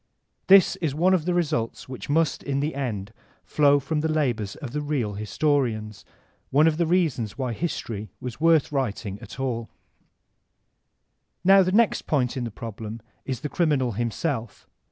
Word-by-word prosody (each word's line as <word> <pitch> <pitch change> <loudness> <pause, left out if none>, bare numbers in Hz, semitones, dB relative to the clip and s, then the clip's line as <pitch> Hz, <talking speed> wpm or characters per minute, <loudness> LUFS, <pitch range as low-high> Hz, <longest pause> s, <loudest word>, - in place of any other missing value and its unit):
This 195 -1 +6
is 155 -5 -2
one 180 +4 +3
of 170 -4 +1
the 180 - +1
results 145 -10 -1
which 130 +1 -8
must, 160 0 +1
in 140 -1 -2
tfie 150 +2 -2
end, 110 -6 -4 0.3
flow 145 -1 +4
from 150 +3 -2
the 160 +1 0
labors 120 -10 -1
of 140 -6 -7
the 150 - -2
real 140 -8 -1
historians; 110 -1 -1 0.4
one 150 +3 +4
of 160 -1 +2
the 170 -1 +1
reasons 155 - 0
why 130 -3 -2
history 110 -8 -4
was 125 +3 -7
worth 165 -3 +4
writing 105 -7 -2
at - - -10
all 115 -4 -2 1.7
Now 195 +1 +7
the 185 0 +1
next 220 +2 +2
point 130 -4 +1
in 125 -2 -2
the - - -3
problem 110 0 -7 0.3
is 130 -3 -4
the - - -2
criminal 145 -8 +1
him 115 +3 -1
self. 115 -3 -4
135 Hz, 170 wpm, -25 LUFS, 115-155 Hz, 1.7 s, Now